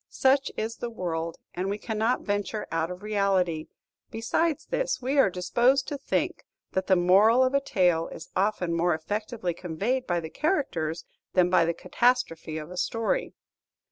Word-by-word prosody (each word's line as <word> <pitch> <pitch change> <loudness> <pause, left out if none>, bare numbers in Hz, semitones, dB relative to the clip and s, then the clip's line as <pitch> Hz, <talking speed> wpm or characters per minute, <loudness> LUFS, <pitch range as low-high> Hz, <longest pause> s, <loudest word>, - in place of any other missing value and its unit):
Such 270 +1 +2
is 225 +1 -3
the 240 - -4
world; 170 -6 -3 0.2
and 185 +2 -2
we 200 - -1
cannot 220 +2 0
venture 205 +1 -2
out 165 0 0
of 180 +2 -8
reality. 190 -6 +1 0.4
Besides 300 +8 0
this, - - -1
we 265 +3 0
are 235 - +6
disposed 240 +9 +2
to 290 - -3
think - - -1 0.3
that 190 0 -1
the 190 - +5
moral 200 +8 +5
of 255 +1 +1
a 280 - +3
tale 180 -10 +2
is 160 - -10
often 190 -3 0
more 170 0 +2
effectively 205 +3 -3
conveyed 190 +10 -2
by 175 -1 +1
the 160 -1 -7
characters 180 - -1 0.3
than 180 -1 +3
by 170 -2 +5
the 170 0 -1
catastrophe 240 -11 0
of 155 +2 -7
a 180 - -8
story. 230 - -1
200 Hz, 170 wpm, -27 LUFS, 175-245 Hz, 0.4 s, are